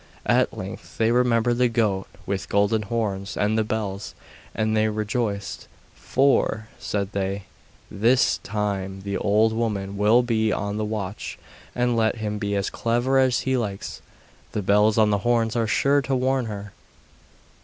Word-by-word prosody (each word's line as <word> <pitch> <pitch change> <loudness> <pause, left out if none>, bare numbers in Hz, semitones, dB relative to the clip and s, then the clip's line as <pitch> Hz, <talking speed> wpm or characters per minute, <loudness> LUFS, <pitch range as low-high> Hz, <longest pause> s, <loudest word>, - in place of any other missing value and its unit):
At - - +2
length - - -8
they 115 0 +3
remembered 120 -1 +2
the 125 -1 +4
goat 105 -5 0 0.2
with 95 0 -3
golden 105 +2 +2
horns 100 -2 -3
and 105 +1 +1
the 110 - +2
bells, 105 -2 -4 0.4
and 110 0 0
they 110 0 +3
rejoiced; 105 -1 -3 0.3
'For,' 110 - +1
said 100 -1 -2
they, 100 0 -2 0.5
'THIS 120 +5 +3
time 100 -2 -3
the 100 0 -4
old 110 +2 +3
woman 100 -4 -2
will 110 +4 +4
be 110 -2 +1
on 105 0 -2
the 110 - -1
watch, 105 -2 -4 0.4
and 125 -1 +1
let 110 0 +2
him 105 -2 -3
be 100 -1 -1
as 100 -1 -1
clever 120 +3 +1
as 130 -2 +3
he 130 0 0
likes, 100 -5 -4 0.5
the 105 - -2
bells 105 +3 +4
on 110 -1 +4
the 100 - +2
horns 115 +1 +1
are 115 -2 +1
sure 140 +6 +3
to 135 -1 -1
warn 130 0 +1
her. 100 -1 -6
110 Hz, 160 wpm, -24 LUFS, 100-115 Hz, 0.5 s, the